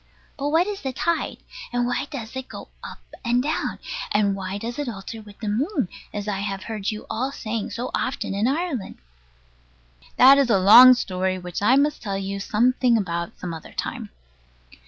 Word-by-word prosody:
But 285 0 -2
what 325 +4 +3
is 410 -1 -5
the 265 -1 -3
tide? 335 +5 -1 0.3
And 245 -1 0
why 245 +3 -1
does 235 -4 -7
it 260 0 -5
go - - -10
up - - -9 0.2
and 245 0 +2
down? 305 +3 -2 0.3
And 200 -2 +2
why 190 0 -4
does 235 +5 -5
it 290 -4 -2
alter 220 +1 -7
with 205 -1 -14
the 215 - -4
moon, 260 - 0 0.2
as 205 0 -5
I 195 -2 -2
heard 200 +1 -3
you 215 -1 -5
all 255 +5 -2
saying 220 -4 -4
so 245 +2 -4
often 255 - -2
in 205 +4 +1
Ireland? 285 - -2 1.2
That 270 +3 +8
is 270 -3 +2
a 215 - +5
long 235 +7 +9
story, 185 -4 -1
which 180 0 -6
I 235 +6 +5
must 290 +2 +2
tell 200 -3 -3
you 195 0 -4
something 240 +4 +2
about 170 -4 -3
some 180 -2 -5
other 160 - -10
time. - - -4
225 Hz, 185 wpm, -23 LUFS, 195-260 Hz, 1.2 s, long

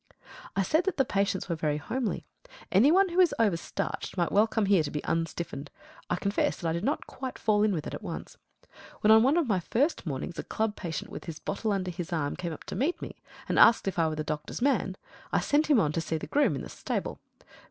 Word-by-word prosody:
I 195 - +2
said 315 - +2
that 385 - -1
the 270 - +3
patients 200 -3 0
were 170 - -1
very 150 -2 0
homely. 235 - -3 0.5
Any 220 +10 +6
one 380 +2 +5
who 350 +2 -1
is 360 -3 +5
over 215 -6 +3
starched 195 +4 -4
might 175 -1 +1
well 210 +2 +5
come 220 -1 0
here 195 -3 +4
to 150 - -3
be 150 - -4
unstiffened. 165 -3 -3 0.4
I - - +2
confess 200 +3 0
that 170 - -3
I 160 - +1
did 170 +2 -3
not 280 +6 -1
quite 260 -1 -6
fall 210 -1 +2
in 215 0 +3
with 160 -5 -2
it - - -5
at - - -5
once. - - -6 0.7
When 210 - +5
on 220 0 +8
one 270 +7 +4
of 340 - +3
my 200 -5 +2
first 250 - 0
mornings 145 +4 -4
a - - -2
club 220 -1 -1
patient 165 -5 -5
with - - -7
his 165 -3 -6
bottle 210 +5 -2
under 185 -2 -1
his 175 0 -6
arm 155 -4 -1
came 175 -2 -4
up 155 - -8
to - - -6
me 310 +8 -2 0.3
and - - +1
asked 230 - +7
me - - +2
if 180 - -4
I 165 - +4
were 155 - -2
the 155 - -2
doctor's 150 0 -4
man, 240 -8 +1 0.3
I - - +3
sent 295 +2 +2
him 290 -6 +5
on 155 -7 +2
to 165 - -1
see 160 0 -2
the - - -6
groom 280 - +2
in 135 - -5
the - - -8
stable. - - -4
195 Hz, 250 wpm, -28 LUFS, 165-240 Hz, 0.7 s, on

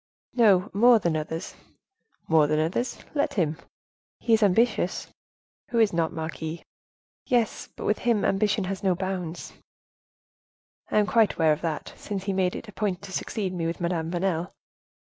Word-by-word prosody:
"He 245 - +1 0.3
more 235 +4 +6
than 170 -6 0
others." 160 +3 -4 0.7
"More 160 -2 +5
than 155 +1 +1
others—let 240 - -2
him." 160 -6 +1 0.6
"He 230 - +1
is 220 - +4
ambitious." 220 +4 +1 0.6
"Who 235 - -2
is 220 -4 +4
not, 165 -1 +1
marquise." 160 0 -5 0.6
"Yes, 240 -4 0
but - - -7
with 210 - +1
him 230 -4 +1
ambition 205 +1 +1
has 190 +1 -4
no 190 -2 +2
bounds." 180 -2 -4 1.4
"I - - +1
am 210 - +5
quite 220 -1 +3
aware 160 -2 +4
of 150 - -5
that, 160 -3 -3
since 200 -3 -5
he 195 0 -1
made 185 -1 +1
it - - -7
a - - -9
point 200 -3 -2
to 200 - -8
succeed 190 0 -3
me 170 -2 -2
with 165 - -3
Madame 170 -2 -1
Vanel." 175 -1 -1
185 Hz, 160 wpm, -26 LUFS, 165-210 Hz, 1.4 s, more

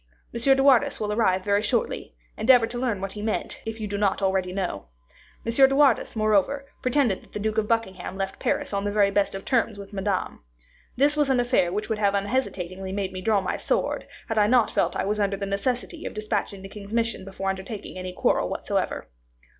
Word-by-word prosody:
M. 265 +3 +3
de 270 - +3
Wardes 270 -4 +4
will 210 -1 -1
arrive 190 -4 +2
very 205 0 +3
shortly; 225 +2 -2 0.2
endeavor 240 +1 +5
to 240 +1 -5
learn 235 -6 -1
what 195 0 -3
he 210 - -6
meant, 215 0 -3
if 225 0 -4
you 215 - -3
do 200 0 -3
not 200 -2 +2
already 190 -2 0
know. 180 - -3 0.6
M. 230 - 0
de 270 +2 +5
Wardes, 275 -6 +3
moreover, 215 +6 +2 0.2
pretended 255 -6 +1
that - - -22
the - - -3
Duke 215 +1 0
of 210 - -1
Buckingham 190 -5 -2
left 195 -1 -3
Paris - - -1
on 200 0 0
the 205 - -1
very 205 -1 +3
best 200 -1 +1
of 195 - -7
terms 230 -4 +1
with 200 0 -10
Madame. 195 - -2 0.5
This 285 +4 +3
was 295 -2 +2
an 260 -2 +3
affair 240 -8 +2
which 210 +3 -2
would 220 -2 -2
have 200 -1 +2
unhesitatingly 195 -4 -2
made 195 -1 -3
me 185 - -5
draw 205 0 +2
my 185 - -2
sword, - - -1 0.2
had 225 -1 0
I 205 - +5
not 240 -1 +4
felt - - +1
that - - -1
I - - -2
was 210 +2 -1
under 200 -1 +1
the 200 - -3
necessity 245 - -2
of - - -8
dispatching 210 -2 -2
the 195 - -8
king's 200 0 -10
mission 230 -2 0
before 195 0 -3
undertaking 190 0 -7
any 185 0 -5
quarrel 180 - +1
whatsoever. - - -2
210 Hz, 220 wpm, -25 LUFS, 195-235 Hz, 0.6 s, endeavor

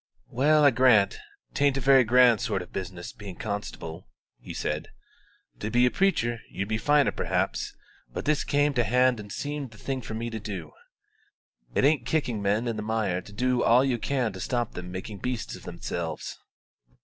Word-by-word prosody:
"Well, 150 +5 +4
I 145 - +7
grant 115 -5 +4 0.3
'tain't 140 -1 +2
a - - 0
very 135 0 +6
grand 120 0 +5
sort 105 -7 -1
of - - -17
business 90 -2 -6
being 100 -4 -9
constable," 95 -5 -5 0.3
he - - -9
said; - - -3 0.7
"to 110 - -3
be 120 +2 +4
a 125 - +3
preacher 120 -12 +1 0.2
'ud 100 - 0
be 110 +1 -1
finer 145 +2 +3
perhaps; - - -1 0.4
but - - -5
this 150 0 +2
came 145 0 +2
to 120 -3 +2
hand 125 0 +3
and 105 -1 -9
seemed 145 0 -4
the 110 - -16
thing 130 +5 -3
for 110 - -6
me 115 +1 -3
to 110 - -4
do. 95 -7 -6 1.0
It - - +3
ain't 150 +1 +2
kicking 125 -9 0
men 105 +4 +1
in 115 -2 -2
the - - -2
mire 105 -4 -1
to 100 - -14
do 125 +3 +1
all 125 +3 +5
you 125 -3 0
can 125 -4 -1
to 95 - -8
stop 120 +2 -2
them 90 0 -7
making 95 +2 -6
beasts 125 +2 -3
of - - -13
themselves." - - -4
120 Hz, 190 wpm, -27 LUFS, 105-130 Hz, 1.0 s, I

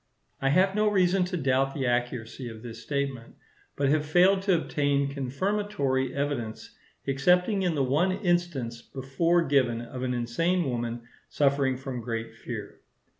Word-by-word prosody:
I 135 - +2
have 185 +6 +4
no 215 +1 +2
reason 190 -2 +3
to 180 0 -3
doubt 135 -2 +1
the 135 -3 -1
accuracy 120 0 -2
of 110 0 -10
this 115 -1 -8
statement, 135 -1 -3 0.4
but 140 -1 +1
have 150 +1 +2
failed 180 +5 +4
to 195 -2 +3
obtain 140 -3 0
confirmatory 140 -1 -1
evidence, 140 -6 -3 0.3
excepting 180 +9 +2
in 175 -3 +1
the 140 - +1
one 150 +9 +2
instance 175 - -1
before 165 +8 0
given 130 -6 +2
of 125 +2 -7
an 125 -1 -1
insane 165 +9 0
woman 120 -1 -3 0.3
suffering 140 -2 +2
from 130 -2 -5
great 115 -1 -4
fear. - - -7
140 Hz, 150 wpm, -27 LUFS, 125-175 Hz, 0.4 s, have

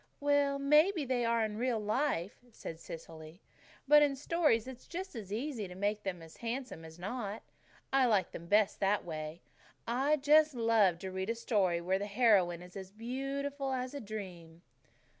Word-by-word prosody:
"Well, 285 -1 +2
maybe 300 +4 +4
they 245 -2 0
are 230 -1 +2
in 215 0 -5
real 245 -2 +1
life," 210 - -1
said 165 -6 -8
Cecily, 160 0 -10 0.5
"but 295 +1 +8
in 285 -2 +3
stories 290 -5 +1
it's 260 -1 -10
just 370 -1 -6
as 205 -4 -7
easy 230 -2 -3
to 180 - -10
make 205 +2 -1
them 180 -4 -4 0.2
handsome 235 -6 -4
as 160 0 -11
not. 205 +3 -5 0.5
I 265 -2 +5
like 210 -5 +2
them 170 - -8
best 205 +1 +3
that 200 +1 +1
way. 155 0 -6 0.4
I 265 +6 +2
just 300 +1 +4
love 225 -6 +3
to 190 - -4
read 190 +2 -3
a 230 - 0
story 195 -7 +1
where 190 +2 0
the 205 - -3
heroine 200 -6 +3
is 185 +1 -9
beautiful 275 +4 -3
as 255 0 -3
a 285 - -5
dream." 180 -6 -8
225 Hz, 170 wpm, -33 LUFS, 190-270 Hz, 0.5 s, but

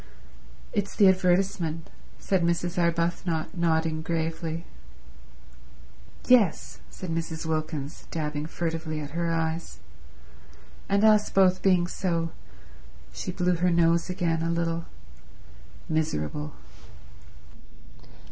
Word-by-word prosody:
"It's 200 -1 -1
the 200 - +6
advertisement," 180 -3 +1 0.3
said 190 -2 0
Mrs. 170 +1 0
Arbuthnot, 170 -1 0
nodding 160 -2 +1
gravely. 165 0 -2 1.6
"Yes," 225 -10 +3
said 185 -3 -7
Mrs. 165 0 -3
Wilkins, 155 -2 -3
dabbing 150 -1 -3
furtively 160 -2 -3
at 145 -1 -6
her 170 +1 -1
eyes, 165 0 -2 1.1
"and 200 +1 +3
us 215 -1 +5
both 185 -1 +4
being 185 -3 +4
so—"—she 165 - -6
blew 180 -1 +1
her 180 +2 +2
nose 170 0 +3
again 170 -3 0
a 165 - 0
little—"miserable." 160 - -4
165 Hz, 90 wpm, -27 LUFS, 160-180 Hz, 1.6 s, the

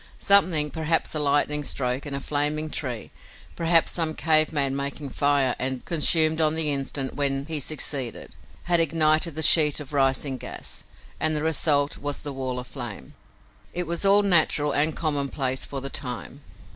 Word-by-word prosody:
Something, 175 -7 +4
perhaps 160 0 0
a 155 - -2
lightning 145 0 +1
stroke 130 +1 -2
and 140 - -4
a - - -3
flaming 150 +2 -1
tree, 125 -6 -4 0.4
perhaps 165 0 +2
some 160 -2 -2
cave 155 -1 +2
man 140 -3 0
making 140 +1 -4
fire 140 -2 +1
and 130 -1 -4
consumed 160 -1 +2
on 155 0 +2
the 160 -2 -1
instant 135 -1 -3
when 140 -1 -2
he 155 -1 -2
succeeded, 140 -4 -3 0.3
had 175 -1 +2
ignited 155 0 +2
the 160 - -1
sheet 150 -2 +6
of 150 -1 -10
rising 135 -1 0
gas, - - -8 0.3
and 155 0 +1
the 150 - -2
result 150 -2 +2
was 145 0 -4
the 145 - -5
wall 130 -1 -4
of 125 - -6
flame. - - -8 0.6
It 180 0 -2
was 170 +2 -1
all 200 +1 +5
natural 155 -5 +2
and 155 +3 0
commonplace, 140 -4 -1
for 135 -1 -6
the 135 - -5
time. 125 +2 -6
150 Hz, 170 wpm, -24 LUFS, 140-160 Hz, 0.6 s, sheet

